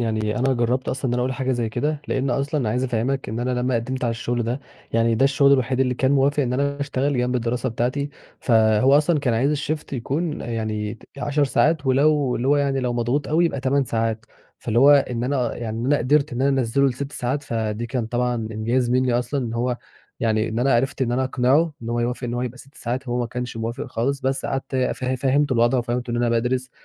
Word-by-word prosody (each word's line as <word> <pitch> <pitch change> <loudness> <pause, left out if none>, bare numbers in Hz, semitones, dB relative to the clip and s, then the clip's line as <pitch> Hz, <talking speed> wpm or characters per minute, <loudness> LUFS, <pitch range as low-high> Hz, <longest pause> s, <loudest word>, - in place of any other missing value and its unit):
يعني 110 -1 -1
أنا 135 +2 +2
جربت 125 +2 0
أصلًا 135 +1 -3
إن 120 - -1
أنا 125 - 0
أقول 130 +1 -1
حاجة 130 +1 -1
زي 120 -2 -1
كده 145 +6 -2
لأن 135 0 0
أصلًا 140 -1 0
عايز 125 +4 0
أفهمك 125 +1 -1
إن 110 +2 -3
أنا 125 +1 -1
لمّا 125 +1 0
قدمت 130 +3 -2
على 120 - +1
الشغل 120 +1 -2
ده 120 +4 -2 0.3
يعني 115 0 +3
ده 130 - +3
الشغل 140 0 +4
الوحيد 130 -1 +1
اللي 125 -1 +2
كان 130 +2 +1
موافق 140 +1 +3
إن 125 -2 -1
أنا 140 +2 -1
أشتغل 140 -1 -1
جنب 125 +1 0
الدراسة 120 +1 -1
بتاعتي، 125 +5 -2 0.3
فهو 110 +3 +4
أصلًا 150 +2 +2
كان 125 -5 0
عايز 135 +5 +2
الشيفت 150 +1 -3
يكون 145 +6 -2
يعني 110 -1 -3 0.2
10 145 +1 +1
ساعات 150 +2 +1
ولو 140 0 +3
اللي 125 +3 -1
هو 145 - +4
يعني 140 -1 +1
لو 125 -1 -1
مضغوط 120 +4 -1
أوي 160 +3 +3
يبقى 150 -5 -1
8 135 +1 +1
ساعات 115 -1 -2 0.3
فاللي 115 0 -1
هو 140 +3 +7
إن 125 -4 +2
أنا 125 -3 -1
يعني 115 -2 -4
أنا 145 +1 +3
قدرت 140 +3 +2
إن 120 +2 -2
أنا 135 -1 +3
أنزله 130 +3 +2
لست 140 +3 -5
ساعات 130 +4 -2
فدي 115 -4 -3
كان 120 -2 -2
طبعًا 125 +1 0
إنجاز 115 +2 -1
مني 125 0 +2
أصلًا، 125 +3 -2
إن 115 - -5
هو 120 +1 0 0.4
يعني 110 -1 +1
إن 110 +1 -3
أنا 130 +1 +3
عرفت 135 +3 0
إن 120 -1 0
أنا 130 +2 +1
أقنعه 135 +5 +2
إن 115 - -6
هو 120 0 0
يوافق 125 +2 -2
إن 120 0 -3
هو 120 - -2
يبقى 125 0 -5
6 135 +2 -15
ساعات 125 +3 -4
هو 120 +1 0
ما 120 - -1
كانش 125 0 -5
موافق 115 +1 -4
خالص، 135 +4 -2
بس 135 0 -1
قعدت 135 0 -3
ف 130 0 -1
فهمته 130 +2 +1
الوضع 120 +1 +3
وفهمته 120 0 -2
إن 120 - -1
أنا 120 0 +1
بادرس 125 +2 0
125 Hz, 230 wpm, -23 LUFS, 120-135 Hz, 0.4 s, هو